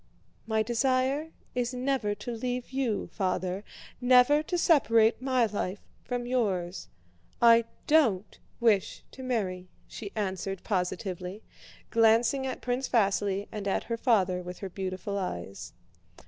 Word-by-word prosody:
"My 220 -1 +2
desire 260 +6 +1 0.2
is 245 0 -1
never 250 -5 0
to 210 +4 -6
leave 245 +2 -3
you, 260 -6 -1
Father, 185 -1 -1 0.4
never 250 +4 +6
to 350 +3 -2
separate 230 -10 +4
my 255 -2 +2
life 200 -2 -3 0.2
from 245 -1 -3
yours. 195 -8 -1 0.5
I 230 -1 +6 0.2
don't 230 -11 +2 0.2
wish 220 -5 +2
to 260 - -10
marry," 195 -8 -2 0.2
she 205 -3 -8
answered 195 -2 -3
positively, 180 0 -3 0.5
glancing 230 +4 +4
at 260 - -5
Prince 250 +2 -2
Vasíli 200 -3 +1
and 205 -2 -5
at 195 - 0
her 230 0 -3
father 195 -7 +2
with 180 0 -7
her 195 - -6
beautiful 190 +2 -4
eyes. 90 - -5
225 Hz, 130 wpm, -29 LUFS, 190-250 Hz, 0.5 s, never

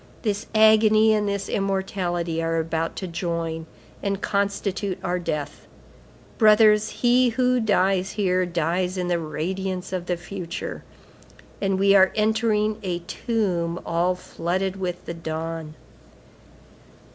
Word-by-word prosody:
This 210 -2 -2
agony 220 0 +6
and 210 -1 +1
this 200 0 -2
immortality 185 -4 -1
are 165 0 0
about 165 0 -2
to 190 - -5
join 165 -2 -3 0.3
and 200 -1 -1
constitute 200 -1 -1
our 180 -1 -1
death. 150 -4 -4 0.7
Brothers, 215 -1 +6
he 245 +1 +3
who 250 +1 +2
dies 195 -3 +1
here 185 -3 +1
dies 175 +2 -1
in 180 -1 -2
the 175 -1 +1
radiance 185 +4 -4
of 180 -1 -3
the 180 - 0
future, 175 -1 -6 0.8
and 195 -1 +1
we 195 +1 +4
are 190 -1 +6
entering 215 0 +1
a 180 -4 -2
tomb 180 -7 -1
all 175 +2 +1
flooded 185 +2 -3
with 180 -2 -4
the - - -4
dawn." 160 -1 -5
190 Hz, 125 wpm, -24 LUFS, 170-210 Hz, 0.8 s, agony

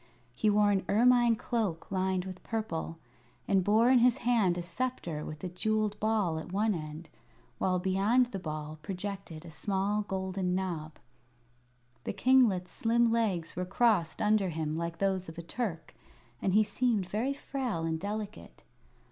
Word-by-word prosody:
He 215 - +1
wore 205 0 +4
an 195 -1 +1
ermine 240 +2 +5
cloak 215 -8 -2
lined 190 -1 0
with 185 -1 -8
purple, 165 -7 -3 0.5
and 195 -2 +3
bore 220 +5 +4
in 260 - +6
his 245 0 +4
hand 215 -8 +3
a 175 - -3
sceptre 175 -5 -3
with 155 +2 -8
a - - -1
jewelled 210 +3 -1
ball 210 -7 +1
at 160 - -8
one 210 +3 +2
end, 155 -1 -7 0.5
while 185 -1 +2
beyond 195 +7 +3
the 195 - -4
ball 155 -2 -5
projected 190 -2 -6
a 165 - -9
small 200 +4 0
golden 190 -2 -2
knob. 165 -5 -3 1.1
The - - -2
kinglet's 205 -5 +3
slim 235 0 +2
legs 200 -8 0
were 180 - -2
crossed 195 -2 +1
under 210 -2 +3
him 155 -2 -2
like 170 +1 -3
those 190 -3 0
of 160 - -11
a 170 - -6
Turk, 170 -3 -4 0.5
and 190 0 +1
he 215 - +6
seemed 215 -3 0
very 240 +8 -1
frail 255 - -3
and 160 0 -1
delicate. 210 +2 -6
195 Hz, 160 wpm, -30 LUFS, 170-220 Hz, 1.1 s, in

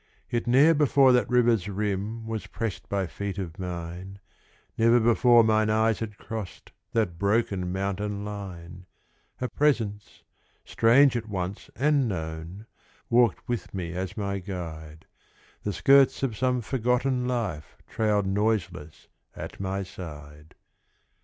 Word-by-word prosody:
Yet 120 0 -1
ne'er 140 +7 +6
before 140 -3 +4
that 125 -1 +2
river's 120 -5 +3
rim 105 +2 -3
Was 110 -4 -4
pressed 110 0 -5
by 100 -1 0
feet 100 +2 -5
of 90 -2 -6
mine, 90 +1 -6 0.6
Never 115 +1 +4
before 120 +1 +5
mine 110 -1 +2
eyes 110 0 +2
had 105 -3 -5
crossed 110 -4 -7 0.2
That 100 -8 0
broken 100 -3 0
mountain 100 +2 -3
line. 90 -3 -8 0.5
A 125 - -1
presence, 115 -9 -1 0.4
strange 130 +4 +4
at 115 -2 -3
once 95 0 -4
and 145 -1 +2
known, 80 +2 -5 0.5
Walked 120 0 +3
with 120 -4 -4
me 85 -3 -4
as 95 +3 -4
my 100 -1 -2
guide; 80 -5 -7 0.6
The 105 - -2
skirts 135 +6 +4
of 125 -5 -1
some 125 +2 0
forgotten 125 +1 0
life 105 -12 -3
Trailed 105 -2 +1
noiseless 95 -6 -2 0.3
at - - -8
my 95 0 -2
side. 75 -5 -11
105 Hz, 130 wpm, -26 LUFS, 95-120 Hz, 0.6 s, ne'er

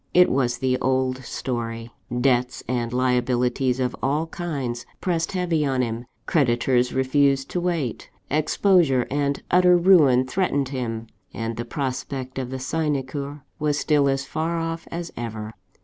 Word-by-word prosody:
It 180 0 +6
was 125 -2 +1
the 130 0 0
old 130 0 +1
story: 115 -2 -4 0.3
debts 125 -1 +1
and 120 -2 -1
liabilities 125 0 +1
of 125 -1 -1
all 145 +4 +1
kinds 140 -9 -4 0.2
pressed 170 -1 -1
heavy 175 -4 +1
on 135 -3 +1
him 115 +1 -4 0.2
creditors 125 -3 +2
refused 135 +1 +2
to 180 - -1
wait 165 -9 -2 0.2
exposure 155 -3 +3
and 140 0 0
utter 180 0 +6
ruin 155 -9 +5
threatened 140 -3 0
him 115 -4 -3 0.3
and 115 0 -3
the 120 - -4
prospect 130 0 -4
of 130 -2 -4
the 130 - -4
sinecure 140 0 -2 0.2
was 150 -1 +1
still 145 -2 +3
as 135 0 0
far 165 +4 -2
off 165 0 -3
as 170 0 -5
ever. 110 -2 -5
135 Hz, 145 wpm, -24 LUFS, 125-155 Hz, 0.3 s, It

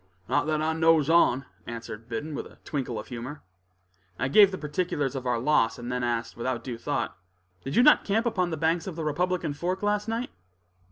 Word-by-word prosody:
"Not - - +1
that 155 0 0
I 160 +1 +1
knows 160 -1 +4
on," 135 -6 +4 0.2
answered 115 -1 -7
Biddon, 135 +7 -4
with - - -5
a - - -18
twinkle 130 -6 -3
of 105 - -7
humor. 130 +5 -7 0.7
I 130 +3 -1
gave 200 +7 +7
the 190 - -5
particulars 150 -3 -1
of 130 -1 -4
our 120 -1 +2
loss, 115 -2 +2
and 120 0 -6
then 125 0 -1
asked, 120 -1 -1
without 120 +1 -3
due 120 -3 -5
thought: 145 - -2 0.5
"Did 135 - -4
you 245 - +6
not 300 - +6
camp 220 +4 +1
upon 190 -7 +1
the 160 - -3
banks 165 +3 +1
of 185 - -5
the 165 - -4
Republican 175 +1 0
Fork 180 +6 -3
last 205 +1 +1
night?" 230 +2 -2
150 Hz, 210 wpm, -27 LUFS, 125-180 Hz, 0.7 s, gave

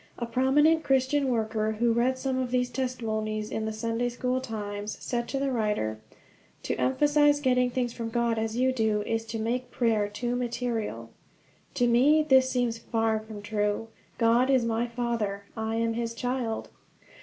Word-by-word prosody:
A 235 - -3
prominent 285 +7 +3
Christian 270 +1 +2
worker, 220 -2 0
who 230 +2 +2
read 250 +3 +1
some 260 0 -1
of 255 -1 -1
these 250 0 0
testimonies 220 -4 -2
in 220 - -2
The 220 - -2
Sunday 230 +2 -1
School 250 +1 -1
Times, 210 -3 -5
said 240 -1 -2
to 275 - -3
the 275 0 0
writer: 210 - -1 0.6
"To - - -1
emphasize 290 - +3
getting 250 -3 +2
things 245 -1 -2
from 230 -1 -4
God, 235 -1 0
as 220 +1 -2
you 260 +1 +3
do, 220 -3 +1
is 225 +1 -2
to 225 0 -4
make 240 +3 -2
prayer 225 -4 +1
too 240 +4 -3
material." 240 -2 -3 0.6
To 245 - +2
me 280 +6 +4
this 260 -2 +5
seems 245 -3 0
far 225 -2 0
from 215 -1 -9
true. 210 +1 -1 0.3
God 235 +3 +3
is 260 -3 +3
my 230 +1 0
Father, 230 -4 -2
I 220 0 -2
am 230 0 0
his 230 0 -3
child. 245 -2 -2
235 Hz, 170 wpm, -27 LUFS, 220-255 Hz, 0.6 s, this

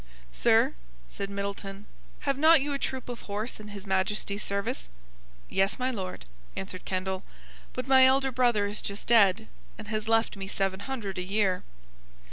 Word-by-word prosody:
"Sir," - - +4 0.3
said 195 - -5
Middleton, 200 0 -5 0.4
"have 275 -1 +1
not 315 +3 +7
you 285 +1 -2
a 280 - -2
troop 260 -2 -3
of 245 -1 -6
horse 210 +4 -3
in 210 - -9
His 205 -1 -9
Majesty's 200 +1 0
service?" 200 - -2 0.6
"Yes, 195 +1 +1
my 255 +1 0
Lord," 185 - -5 0.3
answered 185 -1 -6
Kendall: 190 0 -2 0.5
"but 255 +1 -4
my 265 -1 +7
elder 265 0 +4
brother 240 -5 +3
is 205 +1 -3
just 200 0 -4
dead, 220 -2 +5 0.3
and 215 0 -9
has 215 0 -2
left 225 -1 +3
me 195 -1 -6
seven 195 -1 -1
hundred 205 -6 -4
a - - -2
year." 190 -1 +1
205 Hz, 165 wpm, -28 LUFS, 195-245 Hz, 0.6 s, not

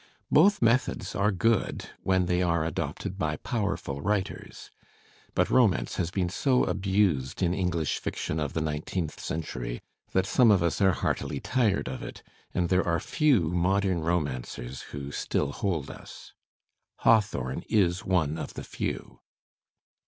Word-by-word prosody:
Both 195 0 +5
methods 115 -5 +1
are 100 +3 +2
good 115 +3 0
— - - -36
when 95 -1 +2
they 90 0 +1
are 85 -3 +1
adopted 90 +3 -4
by 75 -3 0
powerful 100 - -2
writers. 100 +1 -3 0.6
But - - +2
romance 115 -9 +3
has 85 - 0
been 90 -1 0
so 125 +7 +2
abused 95 -8 +1
in 90 0 +2
English 90 -5 -1
fiction 80 - -3
of 75 -3 -2
the 80 - -1
nineteenth 80 +2 -3
century 60 -7 -4 0.3
that 95 0 +3
some 120 +4 +4
of 95 -5 +5
us 85 - 0
are 95 -2 +5
heartily 70 - -2
tired 115 - +1
of 65 0 -5
it, - - -8 0.3
and 85 -1 0
there 95 0 +3
are 85 -1 +2
few 120 - +2
modem 95 +1 +1
romancers 70 -6 -2
who 70 0 -6
still 70 - -1
hold 80 -5 -2
us. - - -12 0.7
Hawthorne 100 - +2
is 95 -4 +2
one 80 -4 +1
of - - -6
the - - -6
few. - - -5
90 Hz, 150 wpm, -28 LUFS, 80-100 Hz, 0.7 s, Both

